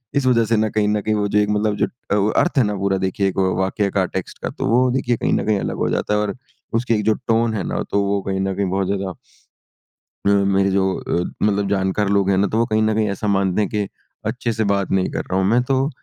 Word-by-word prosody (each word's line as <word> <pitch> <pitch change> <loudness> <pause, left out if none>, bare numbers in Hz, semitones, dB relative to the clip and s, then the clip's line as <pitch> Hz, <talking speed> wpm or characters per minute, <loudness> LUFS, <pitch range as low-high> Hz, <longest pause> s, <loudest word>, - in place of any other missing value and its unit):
इस 140 - +1
वज़ह 115 -3 +3
से 115 0 +1
ना 110 0 +1
कहीं 105 0 0
न 105 0 +1
कहीं 110 +1 0
वो 105 -1 0
जो 105 +1 +2
एक 105 0 +1
मतलब 105 0 +1
जो - - +1 0.4
अ, - - +2
अर्थ 175 -4 -1
है 130 - +6
ना 105 -1 -1
पूरा 95 0 0
देखिए 95 +1 0
एक 95 - -3 0.2
वाक्य 100 +1 0
का 95 -2 +1
टेक्स्ट 95 0 -6
का - - -1
तो - - -4
वो 125 +3 +3
देखिए 125 -2 0
कहीं - - 0
न - - 0
कहीं 105 -2 +1
अलग - - -3
हो - - 0
जाता - - -1
है। 105 - +2
और 105 -1 -2 0.4
उसकी 115 0 +1
एक 105 - -1
जो 110 - +4
टोन 115 0 +2
है 100 - -2
ना - - -2
तो 100 - +2
वो 100 0 0
कहीं 95 0 -1
न 95 0 -1
कहीं 100 -1 -1
बहुत 95 +1 0
ज़्यादा 95 -1 -2 1.1
अ, 100 - +4
मेरे 100 -1 +3
जो 95 0 +2 0.2
अ, 85 - -1 0.2
मतलब 100 -1 +1
जानकार 100 +1 0
लोग 100 -1 +2
हैं 95 - +3
ना 100 - +3
तो 110 - -2
वो 115 - +3
कहीं 110 -1 +1
न 110 0 +2
कहीं 110 -1 +1
ऐसा 100 +2 -3
मानते 95 0 +1
हैं 105 - 0
कि 105 -2 -1 0.4
अच्छे 115 - -2
से 110 0 0
बात 100 -1 0
नहीं 95 -1 +1
कर - - -3
रहा 95 - +2
हूँ 95 - +1
मैं। 120 +3 +4
तो 135 +2 +1
100 Hz, 275 wpm, -20 LUFS, 95-110 Hz, 1.1 s, है